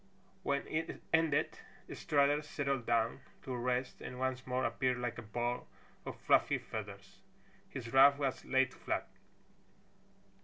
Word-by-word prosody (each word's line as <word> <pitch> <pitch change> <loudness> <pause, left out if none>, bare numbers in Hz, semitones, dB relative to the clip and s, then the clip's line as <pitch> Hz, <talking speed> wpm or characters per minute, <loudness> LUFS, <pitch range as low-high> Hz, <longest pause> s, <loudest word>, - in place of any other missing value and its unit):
When 140 0 0
it 160 +1 -3
ended 160 -2 +2 0.3
Strutter 145 -1 +2
settled 140 -4 -2
down 115 +1 +2 0.2
to 130 - -4
rest 125 +1 -1
and 125 - -6
once 130 0 -2
more 130 +1 0
appeared 125 +2 +1
like 120 -1 -3
a - - -5
ball 120 +3 -2 0.4
of - - -6
fluffy - - +4
feathers. - - -8 0.5
His 120 -2 -7
ruff 140 +1 +8
was 135 -2 -1
laid 130 -1 +2
flat. - - -2
130 Hz, 130 wpm, -34 LUFS, 125-140 Hz, 0.5 s, ruff